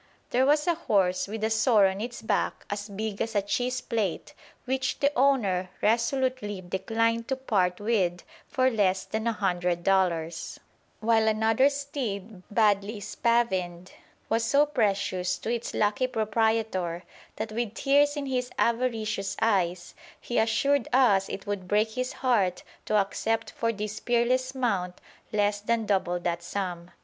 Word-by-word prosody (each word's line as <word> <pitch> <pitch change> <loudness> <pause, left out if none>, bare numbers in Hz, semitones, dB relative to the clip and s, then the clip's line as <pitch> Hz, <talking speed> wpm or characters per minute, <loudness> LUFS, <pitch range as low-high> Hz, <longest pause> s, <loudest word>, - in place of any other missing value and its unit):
There 255 +2 +3
was 295 +1 +3
a 345 - +3
horse 195 - +1
with 215 +1 -5
a 220 - +1
sore 220 -2 +4
on 190 +1 0
its 240 +1 -6
back - - -1
as 205 +1 -4
big 205 0 -4
as 225 -1 -2
a 205 - +3
cheese 250 +5 -1
plate, 215 -9 -2 0.3
which 265 0 -1
the 285 +1 +2
owner 215 -9 +2
resolutely 235 -2 0
declined 225 +5 -1
to 265 - 0
part 190 -9 0
with 195 -5 0 0.2
for 260 0 +2
less 190 -4 +1
than 220 +1 -3
a - - +3
hundred 180 -4 -1
dollars; 170 -4 0 0.4
while 220 0 +3
another 220 +5 +3
steed, 235 -9 -5
badly 205 0 +2
spavined, 190 -5 -1 0.4
was 225 +1 +1
so 280 +5 +4
precious 195 -8 0
to 230 - -3
its 235 -1 -3
lucky 210 +5 +1
proprietor 220 -6 0 0.3
that 225 - -4
with 230 -1 -3
tears 290 +2 +3
in 285 - -3
his 250 -2 -2
avaricious 225 -5 0
eyes 185 -5 0 0.3
he 240 - -1
assured 260 +4 +2
us 205 -7 +4
it 195 - -6
would 200 -3 -4
break 210 +3 +2
his 255 +3 -3
heart 200 -8 +2 0.2
to 215 - 0
accept 220 +3 0
for 230 0 -1
this 215 0 -5
peerless 255 +2 +1
mount 195 -8 -1 0.3
less 205 -1 +1
than 230 +1 0
double 190 -3 +1
that 170 -1 -2
sum. 175 -2 -4
220 Hz, 150 wpm, -27 LUFS, 195-240 Hz, 0.4 s, sore